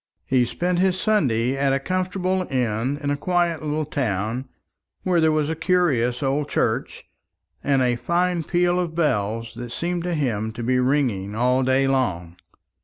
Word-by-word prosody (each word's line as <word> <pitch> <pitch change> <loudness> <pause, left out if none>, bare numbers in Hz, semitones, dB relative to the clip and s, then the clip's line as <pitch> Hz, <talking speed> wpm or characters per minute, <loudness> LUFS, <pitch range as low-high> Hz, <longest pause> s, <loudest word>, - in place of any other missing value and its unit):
He 130 -2 +2
spent 175 +7 -1
his 185 0 +2
Sunday 130 - +1
at 135 0 +1
a 135 - +1
comfortable 185 +3 -1
inn 125 +1 -1
in 145 - 0
a - - +1
quiet 175 +1 0
little 155 0 -2
town, 120 -3 -2 0.5
where 180 -3 +2
there 160 0 +4
was 155 -1 +1
a 160 - -2
curious 155 -8 +1
old 140 +2 0
church, - - -1 0.6
and 135 -2 +2
a 120 -1 +1
fine 175 +6 0
peal 175 +2 +1
of 170 -3 -3
bells 115 -7 0
that 120 -1 -7
seemed 175 +5 -2
to 175 -1 -1
him 110 -7 -1
to 120 +2 -6
be 125 +2 +2
ringing 125 -7 0
all 125 +3 +2
day 130 +1 +2
long. 90 -11 -1
140 Hz, 170 wpm, -23 LUFS, 120-175 Hz, 0.6 s, there